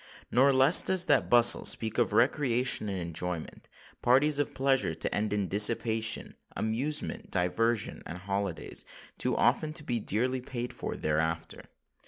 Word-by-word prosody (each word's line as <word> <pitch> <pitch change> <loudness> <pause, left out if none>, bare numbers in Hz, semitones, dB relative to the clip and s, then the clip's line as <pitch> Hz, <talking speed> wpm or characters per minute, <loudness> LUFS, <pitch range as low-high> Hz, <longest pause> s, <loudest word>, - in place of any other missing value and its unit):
Nor 135 +3 +3
less 135 +5 +6
does 185 -1 +2
that 145 -7 +1
bustle 120 0 +6
speak 110 +1 +1
of 120 - +1
recreation 125 -3 +2
and 95 - -4
enjoyment—parties 90 - -2
of 145 - -3
pleasure 135 - 0
to 80 - -1
end 105 0 -2
in 100 -2 -2
dissipation—amusement, 110 +5 -1
diversion, 105 +5 -1
and 85 - -7
holiday, 100 -1 -5 0.5
too - - -1
often 155 -1 0
to 155 - 0
be 120 -4 -3
dearly 125 +5 0
paid 125 -1 -6
for - - -6
thereafter! 80 +2 -3
115 Hz, 135 wpm, -28 LUFS, 100-130 Hz, 0.5 s, less